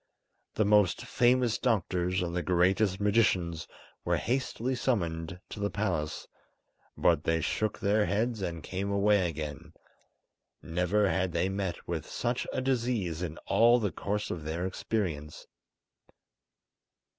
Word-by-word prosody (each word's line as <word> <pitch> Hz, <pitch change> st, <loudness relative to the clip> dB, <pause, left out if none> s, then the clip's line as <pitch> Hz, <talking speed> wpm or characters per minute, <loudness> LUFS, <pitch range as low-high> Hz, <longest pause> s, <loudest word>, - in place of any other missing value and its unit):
The 110 Hz, -, +2 dB
most 105 Hz, -3 st, +3 dB
famous 120 Hz, -1 st, +2 dB
doctors 90 Hz, -6 st, 0 dB
and 85 Hz, 0 st, -3 dB
the 90 Hz, -, 0 dB
greatest 95 Hz, +3 st, +2 dB
magicians 95 Hz, -6 st, +1 dB, 0.4 s
were -, -, +1 dB
hastily 130 Hz, 0 st, -1 dB
summoned 90 Hz, -9 st, -1 dB
to -, -, -7 dB
the 100 Hz, 0 st, 0 dB
palace, 85 Hz, -6 st, -2 dB, 0.7 s
but 80 Hz, -3 st, +3 dB
they 80 Hz, 0 st, +1 dB
shook 110 Hz, +6 st, -1 dB
their 105 Hz, +1 st, +2 dB
heads 110 Hz, +1 st, 0 dB
and 85 Hz, -4 st, -4 dB
came 95 Hz, +2 st, -3 dB
away 100 Hz, -2 st, +3 dB
again; 75 Hz, -2 st, -6 dB, 0.9 s
never 90 Hz, +5 st, +1 dB
had 95 Hz, 0 st, 0 dB
they 85 Hz, +3 st, +1 dB
met 95 Hz, -2 st, -3 dB
with 80 Hz, -3 st, -3 dB
such 120 Hz, +1 st, -2 dB
a -, -, -1 dB
disease 120 Hz, -10 st, -1 dB
in 80 Hz, -3 st, -4 dB
all 120 Hz, +1 st, +5 dB
the 105 Hz, -5 st, -1 dB
course 105 Hz, +1 st, -3 dB
of 80 Hz, -, -4 dB
their 80 Hz, +4 st, -3 dB
experience. 90 Hz, -6 st, -3 dB
95 Hz, 135 wpm, -30 LUFS, 85-110 Hz, 0.9 s, all